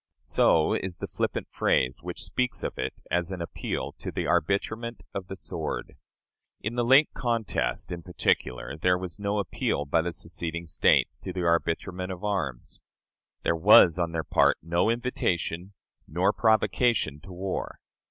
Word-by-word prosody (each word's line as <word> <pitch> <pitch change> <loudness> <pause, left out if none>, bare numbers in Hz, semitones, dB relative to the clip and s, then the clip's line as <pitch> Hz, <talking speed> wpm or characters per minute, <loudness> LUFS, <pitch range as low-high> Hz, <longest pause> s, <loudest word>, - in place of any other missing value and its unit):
So - - +3
is 95 -2 -3
the - - -4
flippant - - -2
phrase 65 +2 +1
which 90 +1 -6
speaks 125 -1 -2
of - - -4
it 65 +1 -2 0.2
as 90 +1 0
an 95 - -4
appeal 85 - -4
to - - -5
the - - -2
"arbitrament 110 +7 0
of 100 -2 -4
the 95 - -6
sword." - - -5 0.6
In 110 - -3
the 120 0 0
late 135 +5 +5
contest, 115 -9 -1
in 85 -1 -4
particular, 70 -6 -1
there 90 +4 +2
was 90 +1 -7
no 100 0 -1
appeal 90 -6 -1
by 80 +3 +2
the 85 +2 -2
seceding 85 0 -4
States 80 - +3
to 95 - -6
the 90 -1 -3
arbitrament 85 +2 0
of 90 +1 -7
arms. 85 -13 -3 0.6
There 85 - +2
was 90 0 +7
on 85 -1 0
their 80 -1 -2
part - - +3
no 85 +5 +1
invitation 100 -6 -1 0.3
nor 90 +6 +1
provocation 110 - +2
to 95 - -13
war. 95 +1 -4
90 Hz, 160 wpm, -27 LUFS, 85-105 Hz, 0.6 s, was